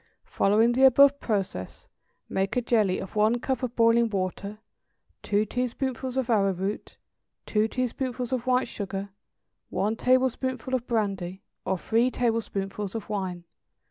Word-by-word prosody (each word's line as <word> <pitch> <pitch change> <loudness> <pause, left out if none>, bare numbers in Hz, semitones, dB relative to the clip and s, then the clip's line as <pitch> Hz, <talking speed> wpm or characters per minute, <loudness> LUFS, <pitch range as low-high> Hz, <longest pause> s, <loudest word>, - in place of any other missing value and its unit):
= - - -56
Following 220 +4 +3
the 250 +2 0
above 280 +2 +7
process, 195 - -3 0.4
make 195 0 -1
a - - +3
jelly 215 -6 +2
of 190 - -7
one 215 +3 +3
cup 265 +2 -2
of 250 -2 -3
boiling 230 0 +4
water, 200 +1 -3 0.6
two 210 +1 +1
teaspoonfuls 255 +2 -3
of 260 -3 0
arrowroot, 195 -3 0 0.5
two 215 0 +1
teaspoonfuls 255 +1 -3
of 250 -1 -2
white 255 0 +2
sugar, 200 -2 -5 0.6
one 215 +3 0
tablespoonful 255 0 +1
of 250 -2 -1
brandy 195 -5 -2 0.2
or 190 0 0
three 230 +7 +2
tablespoonfuls 210 -4 -2
of 225 - -5
wine. 185 -4 -3
225 Hz, 140 wpm, -26 LUFS, 200-250 Hz, 0.6 s, above